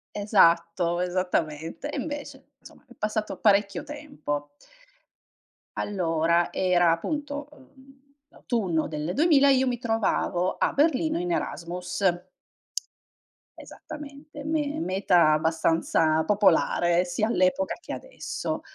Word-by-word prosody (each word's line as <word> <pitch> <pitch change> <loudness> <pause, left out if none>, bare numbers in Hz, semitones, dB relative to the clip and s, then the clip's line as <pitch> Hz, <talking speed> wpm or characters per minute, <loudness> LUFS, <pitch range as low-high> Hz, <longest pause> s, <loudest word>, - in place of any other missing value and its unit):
Esatto, 175 -4 +3
esattamente, 180 - -2
e - - -4
invece, 290 0 -7
insomma - - -17
è - - -16
passato 215 0 -3
parecchio 200 -2 +2
tempo. 150 - -5 1.3
Allora, 170 -3 +1
era 175 -2 +3
appunto, 290 - -3
ehm, 270 -1 -20 0.3
l'autunno 185 - -2
del 155 +2 -4
2000 285 -2 +5
io 265 -1 +4
mi 245 -1 -1
trovavo 220 -6 0
a - - +1
Berlino 315 +2 +1
in 355 0 -2
Erasmus. 180 - -4 1.5
Esattamente, 295 0 -10
me 300 -1 -1
meta 175 -3 +3
abbastanza 160 0 +2
popolare, 180 -4 +3
sia 180 +5 -1
all'epoca 235 +7 +1
che - - -7
adesso. - - -5
200 Hz, 100 wpm, -26 LUFS, 170-285 Hz, 1.5 s, 2000